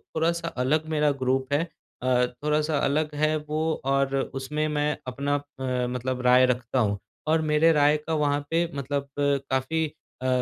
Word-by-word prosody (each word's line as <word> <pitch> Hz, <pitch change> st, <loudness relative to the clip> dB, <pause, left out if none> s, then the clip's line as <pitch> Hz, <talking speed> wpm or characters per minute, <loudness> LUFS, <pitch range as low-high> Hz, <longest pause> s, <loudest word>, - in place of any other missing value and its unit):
थोड़ा-सा 165 Hz, +1 st, 0 dB
अलग 150 Hz, +2 st, 0 dB
मेरा 150 Hz, -2 st, +2 dB
ग्रुप 130 Hz, +1 st, 0 dB
है। 145 Hz, +3 st, +3 dB, 0.4 s
अ, 125 Hz, -1 st, +3 dB, 0.2 s
थोड़ा-सा 150 Hz, 0 st, +1 dB
अलग 150 Hz, +2 st, 0 dB
है 155 Hz, +1 st, +2 dB
वो 150 Hz, +1 st, -3 dB, 0.2 s
और 135 Hz, 0 st, +1 dB, 0.2 s
उसमें 150 Hz, +3 st, -2 dB
मैं 150 Hz, -1 st, 0 dB
अपना 140 Hz, +3 st, -1 dB
अ, 130 Hz, -3 st, -3 dB
मतलब 125 Hz, +1 st, -3 dB
राय 125 Hz, +1 st, +7 dB
रखता 125 Hz, 0 st, 0 dB
हूँ 100 Hz, -3 st, +1 dB, 0.3 s
और 160 Hz, +1 st, +3 dB
मेरे 155 Hz, +2 st, +5 dB
राय 150 Hz, 0 st, +4 dB
का 160 Hz, -, 0 dB
वहाँ 145 Hz, -2 st, +2 dB
पे 170 Hz, +1 st, +1 dB
मतलब 140 Hz, 0 st, -2 dB
काफ़ी 140 Hz, +2 st, 0 dB, 0.4 s
अ, 130 Hz, -, -1 dB
145 Hz, 160 wpm, -26 LUFS, 130-155 Hz, 0.4 s, राय